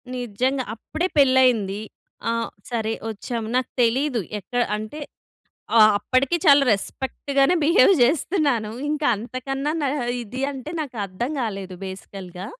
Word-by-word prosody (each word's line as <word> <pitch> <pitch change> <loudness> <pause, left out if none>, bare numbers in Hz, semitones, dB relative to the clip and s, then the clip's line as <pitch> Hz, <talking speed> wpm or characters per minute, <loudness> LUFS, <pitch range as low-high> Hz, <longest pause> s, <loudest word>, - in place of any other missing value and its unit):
నిజంగా. 255 +3 -1
అప్పుడే 315 +10 -3
పెళ్ళయింది. 250 -7 +4 0.5
ఆ! - - +2 0.4
సరే 225 -2 -1 0.2
వచ్చాం 225 +2 -4
నాకు 255 - +1
తెలీదు. 250 +2 +2 0.2
ఎక్కడ, 245 +6 -2 0.2
అంటే 215 +8 -7 0.8
ఆ! - - +8 0.2
అప్పటికి 255 +9 +1
చాలా 285 -3 +7
రెస్పెక్ట్‌గానే 275 - 0
బిహేవ్ 360 +6 +6
చేస్తున్నాను, 275 - +1 0.2
ఇంక 300 0 -2
అంతకన్నా 270 +6 -3 0.3
ఇది 240 +4 -7
అంటే 270 +2 -7
నాకు 275 -5 -6
అర్థం 200 +8 -4
కాలేదు 195 -5 -4
బేసికల్‌గా. 190 -1 -8
255 Hz, 115 wpm, -23 LUFS, 215-280 Hz, 0.8 s, ఆ